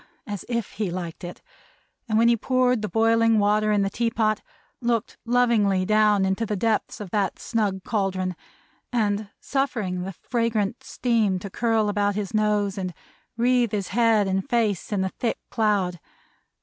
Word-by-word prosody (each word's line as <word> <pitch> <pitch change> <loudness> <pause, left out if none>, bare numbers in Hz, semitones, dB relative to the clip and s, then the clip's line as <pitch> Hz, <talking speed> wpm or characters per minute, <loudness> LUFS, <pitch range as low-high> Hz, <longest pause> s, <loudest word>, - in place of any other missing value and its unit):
as 205 -5 -5
if 235 -3 -2
he 205 -3 -2
liked 175 -1 -6
it; 175 0 -8 0.7
and 215 - +2
when 230 +1 +5
he 235 - +5
poured 250 0 +1
the 210 - -3
boiling 225 +2 +3
water 210 +1 +2
in 205 -1 +3
the - - +1
tea 235 +2 0
pot, 215 -2 0 0.4
looked 235 -2 -1
lovingly 230 -6 +3
down 210 -1 +3
into 190 +4 0
the 215 -1 -1
depths 220 +2 -1
of 200 -4 -7
that 200 -3 0
snug 205 -5 -1
caldron, 190 -4 -1 0.6
and 210 -3 0
suffering 220 -10 -1
the 190 +2 -4
fragrant 230 +1 -1
steam 225 -6 +1
to 195 +1 -7
curl 225 -1 +1
about 205 -1 +1
his 200 -3 -3
nose, 210 -2 +1
and 185 -3 -4 0.4
wreathe 240 -1 +2
his 200 -3 -2
head 225 -2 +3
and 190 0 -1
face 220 -6 0
in 200 -2 +1
a 190 - -1
thick 235 - 0
cloud. 200 -5 +1
210 Hz, 165 wpm, -24 LUFS, 195-230 Hz, 0.7 s, when